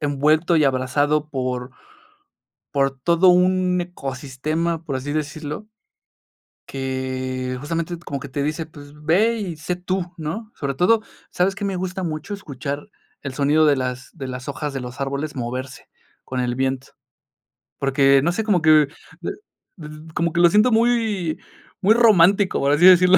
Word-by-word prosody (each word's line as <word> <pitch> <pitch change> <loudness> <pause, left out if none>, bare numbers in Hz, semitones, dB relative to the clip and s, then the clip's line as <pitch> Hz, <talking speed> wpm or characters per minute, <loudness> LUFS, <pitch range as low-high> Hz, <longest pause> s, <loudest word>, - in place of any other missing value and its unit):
envuelto 155 +4 +2
y 155 - +4
abrazado 145 +3 +1
por 125 -2 -3 1.0
por 135 -1 +3
todo 170 +5 +4
un 180 0 +3
ecosistema, 155 +1 -3
por 140 -5 -4
así 145 +3 -4
decirlo. 155 +5 -4 1.0
Que 130 -1 -3
justamente 165 +3 -3
t 170 - -18
como 140 -1 -4
que 140 - -8
te 140 +2 -3
dice, 155 +2 -2
pues 145 -2 -14
ve 180 +10 +2
y 185 -6 -4
sé 175 +4 -3
tú, 180 0 -3
¿no?, 210 +8 -5
sobre 140 -2 -3
todo, 215 +9 +3 0.3
¿sabes 190 +2 +1
qué 205 - -4
me 195 - -1
gusta 185 +1 -3
mucho? 160 +5 -4
Escuchar 145 -5 -5 0.3
el 140 -2 -5
sonido 150 +3 +3
de 145 - +5
las 130 -1 -4
de 135 - -7
las 125 +1 -6
hojas 145 0 -4
de 135 - -3
los 125 +2 -7
árboles 140 +2 -3
moverse 130 +2 -5 0.4
con 130 -1 -4
el 125 -1 -1
viento, 130 0 -1 0.9
porque 135 0 +4
no 170 - +2
sé, 220 - -1
como 195 -6 +2
que 155 -2 +6 0.3
d - - -3 0.5
d 155 0 -11
como 170 -1 0
que 170 - +2
lo 175 - +7
siento 210 +5 +4
muy, 220 -7 +1 0.4
muy 205 +3 +5
romántico, 200 -4 +5
por 140 +1 +2
así 170 +5 +4
decirlo. 185 0 +8
155 Hz, 165 wpm, -22 LUFS, 135-180 Hz, 1.0 s, decirlo